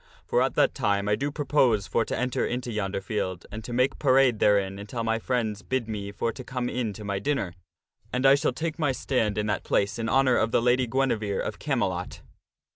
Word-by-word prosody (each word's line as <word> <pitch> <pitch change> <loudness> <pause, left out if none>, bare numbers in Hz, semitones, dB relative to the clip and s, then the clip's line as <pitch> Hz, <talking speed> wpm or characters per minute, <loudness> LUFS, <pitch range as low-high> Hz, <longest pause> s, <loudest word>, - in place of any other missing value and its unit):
For - - +2
at - - +1
that - - +3
time 100 -1 0
I 105 - +3
do 140 +6 -2
propose 135 -8 +2
for 115 - +1
to - - -3
enter 125 +1 -1
into 125 0 -2
yonder 95 -3 -2
field, 95 -3 -3
and 110 +1 -6
to 120 - -7
make 125 +2 +1
parade 130 -4 +4
therein 100 -1 +2
until 110 +3 -5
my 115 0 0
friends 110 -4 -1
bid 130 -3 -2
me 100 -2 -4
for 115 +3 -1
to 130 - -9
come 125 0 -3
in 120 -4 -2
to 105 - -9
my 100 -1 -2
dinner; 130 -7 -1 0.6
and 125 +2 -1
I 135 - +8
shall 140 - +2
take 160 +5 -4
my 145 -4 +1
stand 115 -6 0
in 105 - 0
that 105 -1 -1
place 100 +3 0
in 115 0 -1
honor 130 -2 +4
of 110 - +2
the - - +3
Lady 125 +1 +2
Guinevere 115 -5 0
of - - -5
Camelot." - - -2
115 Hz, 220 wpm, -26 LUFS, 105-130 Hz, 0.6 s, I